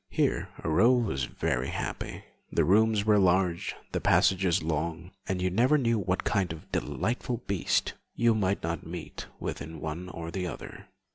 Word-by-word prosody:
Here -, -, 0 dB
Aurore 115 Hz, +10 st, +4 dB
was 65 Hz, -, -1 dB
very 65 Hz, +1 st, -1 dB
happy. -, -, -4 dB, 0.3 s
The -, -, +2 dB
rooms 105 Hz, +2 st, +4 dB
were 105 Hz, -1 st, +5 dB
large, 90 Hz, -2 st, +2 dB, 0.2 s
the -, -, -1 dB
passages 90 Hz, -1 st, +3 dB
long, 80 Hz, +3 st, -2 dB, 0.2 s
and 95 Hz, -1 st, -1 dB
you 90 Hz, -, +1 dB
never 125 Hz, +10 st, +4 dB
knew 115 Hz, -5 st, +2 dB
what 90 Hz, -1 st, -1 dB
kind 95 Hz, -5 st, +1 dB
of 80 Hz, -1 st, -10 dB
delightful 120 Hz, +1 st, -2 dB
beast 100 Hz, -3 st, 0 dB, 0.2 s
you 120 Hz, -1 st, +4 dB
might 100 Hz, -2 st, 0 dB
not 85 Hz, -1 st, -2 dB
meet 85 Hz, 0 st, -7 dB
with -, -, -4 dB
in 80 Hz, 0 st, -7 dB
one 80 Hz, +4 st, -5 dB
or 85 Hz, -1 st, -6 dB
the 90 Hz, -1 st, -2 dB
other. -, -, -8 dB
90 Hz, 165 wpm, -29 LUFS, 85-105 Hz, 0.3 s, were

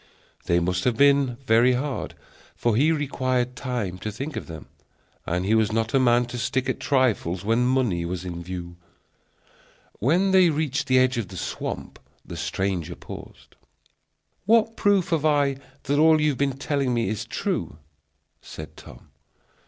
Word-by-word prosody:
They 85 Hz, 0 st, +3 dB
must 90 Hz, +1 st, -1 dB
have 125 Hz, -3 st, +1 dB
been 140 Hz, -3 st, +4 dB
very 120 Hz, +2 st, +4 dB
hard, 135 Hz, +2 st, -3 dB, 0.4 s
for 120 Hz, -3 st, 0 dB
he 150 Hz, +7 st, +4 dB
required 130 Hz, -4 st, -1 dB
time 120 Hz, -8 st, -3 dB
to 105 Hz, -, -4 dB
think 135 Hz, +8 st, -6 dB
of -, -, -5 dB
them, 80 Hz, -2 st, -9 dB, 0.6 s
and 90 Hz, +2 st, -1 dB
he 105 Hz, -, +2 dB
was 110 Hz, -1 st, +3 dB
not 110 Hz, 0 st, -1 dB
a 135 Hz, -, +4 dB
man 120 Hz, -1 st, +4 dB
to 120 Hz, 0 st, -6 dB
stick 130 Hz, +3 st, -1 dB
at 130 Hz, -, -2 dB
trifles 110 Hz, -9 st, 0 dB
when 115 Hz, +3 st, +2 dB
money 125 Hz, -10 st, +1 dB
was 90 Hz, +1 st, -4 dB
in 85 Hz, -1 st, -5 dB
view. 85 Hz, -1 st, -7 dB, 1.2 s
When 175 Hz, -, +2 dB
they 190 Hz, -1 st, +6 dB
had 165 Hz, -, +3 dB
reached 150 Hz, -1 st, -1 dB
the 130 Hz, 0 st, +4 dB
edge 130 Hz, -1 st, +3 dB
of 110 Hz, -, -3 dB
the 95 Hz, -, -10 dB
swamp, -, -, -5 dB, 0.3 s
the -, -, -8 dB
stranger 90 Hz, -3 st, -2 dB
paused. -, -, -11 dB, 0.9 s
"What 225 Hz, 0 st, +4 dB
proof 200 Hz, -4 st, +2 dB
have 165 Hz, -3 st, 0 dB
I 145 Hz, -3 st, +2 dB, 0.3 s
that 145 Hz, +2 st, 0 dB
all 160 Hz, 0 st, +6 dB
you 150 Hz, 0 st, +3 dB
have 140 Hz, -, -2 dB
been 140 Hz, -2 st, 0 dB
telling 140 Hz, -3 st, -1 dB
me 115 Hz, -4 st, 0 dB
is 105 Hz, +1 st, -2 dB
true?" -, -, -3 dB, 0.6 s
said 80 Hz, -, -10 dB
Tom. -, -, -14 dB
125 Hz, 170 wpm, -24 LUFS, 100-140 Hz, 1.2 s, they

